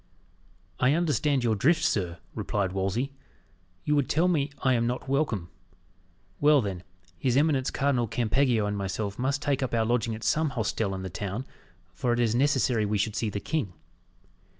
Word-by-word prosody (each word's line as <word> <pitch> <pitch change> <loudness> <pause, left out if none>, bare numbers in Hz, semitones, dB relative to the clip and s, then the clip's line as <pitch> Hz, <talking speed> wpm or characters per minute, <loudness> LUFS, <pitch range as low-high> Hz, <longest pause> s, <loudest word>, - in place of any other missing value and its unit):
"I 130 +2 +4
understand 150 -5 +1
your 115 -2 +2
drift, 155 - +3
sir," 90 - 0 0.2
replied 100 -3 -1
Wolsey; 95 +8 -1 0.7
"you 150 - +1
would 145 -3 +1
tell 165 +4 +3
me 150 -5 +1
I 130 -1 +2
am 115 -1 +1
not 125 +2 -3
welcome. 130 - -1 0.9
Well, 150 0 +5
then, 100 -6 -3 0.4
his 130 -3 +1
eminence 145 -3 +2
Cardinal 135 -4 +1
Campeggio 120 0 +1
and 105 0 -1
myself 100 +1 -3
must 140 +3 0
take 140 -2 0
up 130 -2 -1
our 115 -1 +2
lodging 115 -1 0
at 110 - -9
some 155 +9 +2
hostel 105 -2 -1
in 95 - -5
the 95 - -5
town, 100 +7 -4 0.5
for 120 -1 0
it 120 - -1
is 115 -2 +2
necessary 130 -3 +2
we 105 0 0
should 105 +1 -1
see 110 - -1
the 100 - -3
king." 110 - -2
120 Hz, 175 wpm, -27 LUFS, 105-140 Hz, 0.9 s, Well